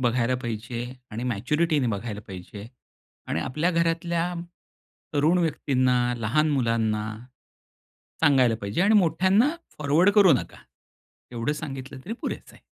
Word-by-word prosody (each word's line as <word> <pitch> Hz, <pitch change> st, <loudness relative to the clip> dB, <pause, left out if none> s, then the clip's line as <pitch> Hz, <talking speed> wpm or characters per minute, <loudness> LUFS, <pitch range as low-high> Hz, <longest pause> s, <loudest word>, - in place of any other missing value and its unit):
बघायला 120 Hz, 0 st, +1 dB
पाहिजे 115 Hz, +1 st, -4 dB, 0.3 s
आणि 115 Hz, +3 st, -5 dB
मॅच्युरिटीने 145 Hz, -, 0 dB
बघायला 105 Hz, 0 st, -4 dB
पाहिजे 95 Hz, +2 st, -9 dB, 0.6 s
आणि 80 Hz, -, -1 dB
आपल्या 155 Hz, -, 0 dB
घरातल्या 170 Hz, +1 st, 0 dB, 0.8 s
तरुण 155 Hz, +5 st, +3 dB
व्यक्तींना, 130 Hz, -6 st, +1 dB
लहान 135 Hz, +8 st, +1 dB
मुलांना, 115 Hz, -5 st, 0 dB, 1.2 s
सांगायला 130 Hz, -6 st, +4 dB
पाहिजे 100 Hz, +8 st, -2 dB
आणि 210 Hz, +2 st, +4 dB
मोठ्यांना 195 Hz, -, +4 dB, 0.3 s
फॉरवर्ड 150 Hz, +7 st, +4 dB
करू 200 Hz, -6 st, +7 dB
नका. 125 Hz, -, -3 dB, 0.7 s
एवढं 120 Hz, +5 st, -1 dB
सांगितलं 135 Hz, -3 st, -7 dB
तरी 215 Hz, -, -5 dB
पुरेसं -, -, -5 dB
आहे. -, -, -19 dB
135 Hz, 120 wpm, -25 LUFS, 115-165 Hz, 1.2 s, करू